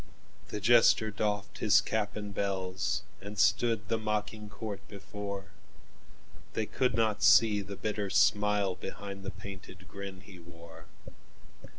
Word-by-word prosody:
The 105 - -4
jester 110 0 +5
doffed 105 0 -2
his 105 - +5
cap 105 -2 -2
and 105 -1 -5
bells, 95 -1 -1 0.2
And 100 +1 -8
stood 110 0 +2
the 115 - 0
mocking 105 0 -3
court 100 0 -6
before; 100 0 -7 1.0
They 110 - -1
could 125 +1 0
not 110 -2 +1
see 105 -3 +6
the 100 0 -7
bitter 105 0 -2
smileBehind 100 -1 +1
the 95 - -5
painted 95 -1 -10
grin 100 0 -8
he 95 -4 -13
wore. 85 -1 -13
100 Hz, 125 wpm, -31 LUFS, 95-105 Hz, 1.0 s, see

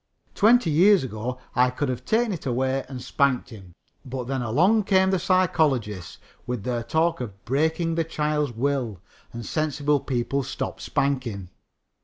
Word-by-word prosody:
Twenty 220 -5 +4
years 185 +3 +5
ago 120 +1 -4 0.2
I 125 +1 +4
could 140 +3 -2
have 125 0 -4
taken 225 - +1
it 160 - -6
away 130 +2 0
and 130 -2 -7
spanked 130 -1 0
him, 95 -6 -12 0.3
but 130 0 -5
then 130 +1 -2
along 180 - +3
came 190 -1 +3
the 190 - +1
psychologists 150 - +1 0.3
with 120 -4 -3
their 120 0 -1
talk 160 +5 0
of 100 -5 -8
breaking 160 +5 0
the 165 0 +1
child's 150 -3 -1
will, 120 -4 -1 0.3
and 115 -1 -7
sensible 150 +1 0
people 130 +1 -1
stopped 130 - -5
spanking. 120 -9 -2
135 Hz, 155 wpm, -25 LUFS, 120-160 Hz, 0.3 s, years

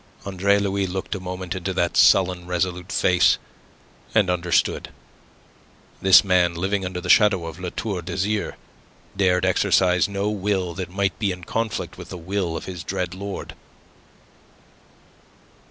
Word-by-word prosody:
Andre 100 +1 +2
Louis 100 -1 0
looked 95 +1 -4
a 100 - -4
moment 90 -1 -5
into 95 0 -3
that 85 -2 0
sullen, 90 -2 +4
resolute 90 +1 -2
face, 90 -1 +3 0.8
and 100 -5 +4
understood. 90 -1 0 1.1
This 95 0 +7
man, 90 -3 +2
living 95 +3 -1
under 90 -1 -4
the 90 - -7
shadow 100 -3 +4
of 80 +1 -8
La 90 -1 -4
Tour 100 -1 -4
d'Azyr, 95 +5 -2 0.6
dared 90 -2 +2
exercise 95 0 +3
no 100 0 -2
will 100 -4 -1
that 90 +1 -5
might 100 +1 -1
be 105 -3 +1
in 90 -1 -7
conflict 115 +5 -3
with - - -9
the - - -7
will 90 -1 -2
of - - -7
his 90 -3 -7
dread 90 +2 -3
lord. 100 +1 -6
95 Hz, 145 wpm, -23 LUFS, 90-100 Hz, 1.1 s, This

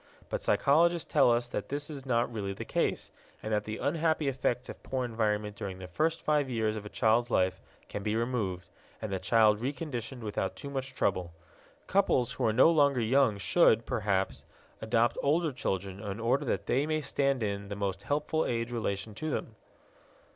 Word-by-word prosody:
But - - -2
psychologists 170 - +2
tell - - +6
us 120 0 +2
that - - -4
this 145 +1 -3
is 140 -3 -8
not 120 -1 +1
really 100 -3 -3
the - - -7
case, - - -1 0.3
and 110 - -2
that 105 0 0
the 110 0 -4
unhappy 160 0 0
effects 125 -2 -1
of - - -9
poor 130 -1 -2
environment 105 -3 -1
during 100 -3 -5
the 95 - -8
first 160 - -1
five 150 -3 +2
years 110 -3 0
of 105 -1 -6
a - - -9
child's 115 +2 +2
life 95 -5 +1 0.3
can 105 - -5
be 105 +2 -1
removed, 110 -7 -2 0.3
and 110 -3 -4
the 95 - -1
child 110 -1 +4
reconditioned 130 -2 -4
without 105 -3 -2
too 140 - -7
much 135 -1 -4
trouble. 90 -7 0 0.5
Couples 190 - +2
who - - -2
are - - +3
no 130 +9 +6
longer 140 -5 +4
young 120 -1 +3
should, 115 - +4
perhaps, 100 -3 -1 0.4
adopt 115 +1 +1
older 155 +3 +2
children 95 -6 -3
in 100 0 -5
order 120 +4 +1
that - - -1
they 140 +4 +1
may 155 0 0
stand 140 -4 0
in 100 -1 -3
the 100 - -5
most 100 -1 -2
helpful 150 +5 0
age 115 0 -2
relation 110 -3 -3
to 155 +9 -4
them. 115 -5 -3
120 Hz, 190 wpm, -30 LUFS, 105-140 Hz, 0.5 s, tell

